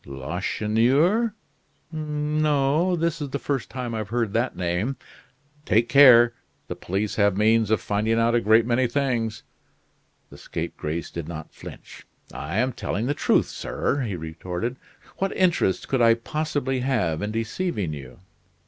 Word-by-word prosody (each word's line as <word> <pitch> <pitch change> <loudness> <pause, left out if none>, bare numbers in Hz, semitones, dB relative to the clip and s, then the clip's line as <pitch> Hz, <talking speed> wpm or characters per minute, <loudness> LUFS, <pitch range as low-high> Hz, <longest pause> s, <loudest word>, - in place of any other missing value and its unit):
"Lacheneur? 120 - +1 0.6
No, 150 +1 0
this 165 -1 -1
is 145 - -3
the 140 - -2
first 140 -3 -3
time 125 -3 -5
I've 110 -2 -4
heard 115 -3 -1
that 120 +3 0
name." 90 +9 -1 0.7
"Take 115 -3 +2
care. 120 -4 +7 0.3
The - - -5
police 100 +3 -3
have 100 -2 +3
means 110 0 +3
of 110 - +2
finding 110 +2 0
out 115 +1 +2
a 120 - +3
great 110 +2 +4
many 125 +1 +2
things." 120 -4 -1 0.9
The - - -12
scapegrace 80 +2 -5
did 85 -2 -6
not 80 -2 -8
flinch. - - -12 0.3
"I 80 +7 -4
am 125 +3 +1
telling 110 +1 -3
the 140 - 0
truth, - - +2
sir," 140 - -2
he 110 -7 -3
retorted. 85 +7 -5 0.4
"What 195 0 -1
interest 175 - +1
could 130 -2 0
I 115 -1 +6
possibly 145 +1 -2
have 120 - 0
in 105 - -2
deceiving 110 - -2
you?" 70 +2 -10
115 Hz, 150 wpm, -24 LUFS, 105-140 Hz, 0.9 s, care